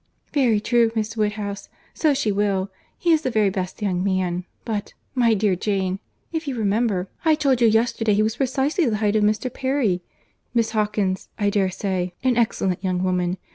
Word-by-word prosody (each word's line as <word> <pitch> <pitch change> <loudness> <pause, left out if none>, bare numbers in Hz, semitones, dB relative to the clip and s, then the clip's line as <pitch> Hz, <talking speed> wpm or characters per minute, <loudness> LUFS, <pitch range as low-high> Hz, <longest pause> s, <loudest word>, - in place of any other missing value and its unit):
"Very 250 -7 +3
true, 230 +1 +3
Miss 220 0 -2
Woodhouse, 210 -2 -2 0.2
so 305 -3 +2
she 220 -5 +1
will. 200 -1 0 0.3
He 345 - +1
is 315 -2 +4
the 260 - -1
very 215 -4 +2
best 185 +2 -4
young 185 -3 0
man—But, 185 +3 -3 0.2
my 235 -4 +3
dear 205 -2 +2
Jane, 190 0 -1 0.3
if 320 -2 -3
you 265 -3 -2
remember, 205 -3 +1 0.2
I 320 -2 +4
told 275 -5 +1
you 235 - +6
yesterday 225 -1 +2
he 210 - +3
was 220 +2 -1
precisely 275 +5 +1
the 215 - 0
height 210 0 +1
of 215 - +3
Mr. 215 +4 +1
Perry. 260 -9 0 0.5
Miss 230 -1 +2
Hawkins,—I 205 -1 -1
dare 195 -2 +2
say, 185 -2 -2
an 255 -2 +3
excellent 195 -5 0
young 185 -1 0
woman. 180 0 0
210 Hz, 175 wpm, -23 LUFS, 190-240 Hz, 0.5 s, you